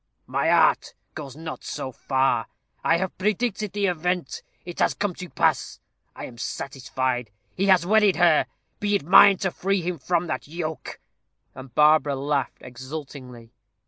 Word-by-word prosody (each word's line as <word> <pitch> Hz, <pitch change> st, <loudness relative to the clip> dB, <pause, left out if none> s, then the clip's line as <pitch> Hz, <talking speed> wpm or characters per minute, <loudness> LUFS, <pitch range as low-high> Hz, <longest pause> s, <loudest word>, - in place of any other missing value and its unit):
"My -, -, 0 dB
art -, -, +3 dB, 0.2 s
goes 140 Hz, -4 st, -8 dB
not 160 Hz, 0 st, -8 dB
so 135 Hz, -3 st, -5 dB
far. 130 Hz, -3 st, 0 dB, 0.4 s
I 165 Hz, -, +3 dB
have 190 Hz, +1 st, -3 dB
predicted 210 Hz, 0 st, -1 dB
the 205 Hz, -1 st, 0 dB
event. 180 Hz, -4 st, -2 dB, 0.2 s
It 175 Hz, -1 st, -8 dB
has -, -, +2 dB
come 205 Hz, -3 st, -2 dB
to 180 Hz, 0 st, -9 dB
pass. -, -, 0 dB, 0.4 s
I -, -, -7 dB
am 120 Hz, -2 st, -12 dB
satisfied. 130 Hz, -3 st, -3 dB, 0.3 s
He 195 Hz, -, 0 dB
has 185 Hz, -3 st, +4 dB
wedded 210 Hz, 0 st, +4 dB
her. 170 Hz, -3 st, +4 dB, 0.3 s
Be 205 Hz, 0 st, 0 dB
it 180 Hz, -, -1 dB
mine 195 Hz, +3 st, +7 dB
to 190 Hz, 0 st, -2 dB
free 195 Hz, 0 st, -1 dB
him 175 Hz, -2 st, -3 dB
from 175 Hz, +5 st, 0 dB
that 160 Hz, -, -4 dB
yoke." 160 Hz, 0 st, -6 dB, 0.5 s
And 130 Hz, -2 st, -12 dB
Barbara 150 Hz, -1 st, +4 dB
laughed 140 Hz, 0 st, -2 dB
exultingly. 130 Hz, -2 st, -9 dB
160 Hz, 155 wpm, -24 LUFS, 135-185 Hz, 0.5 s, mine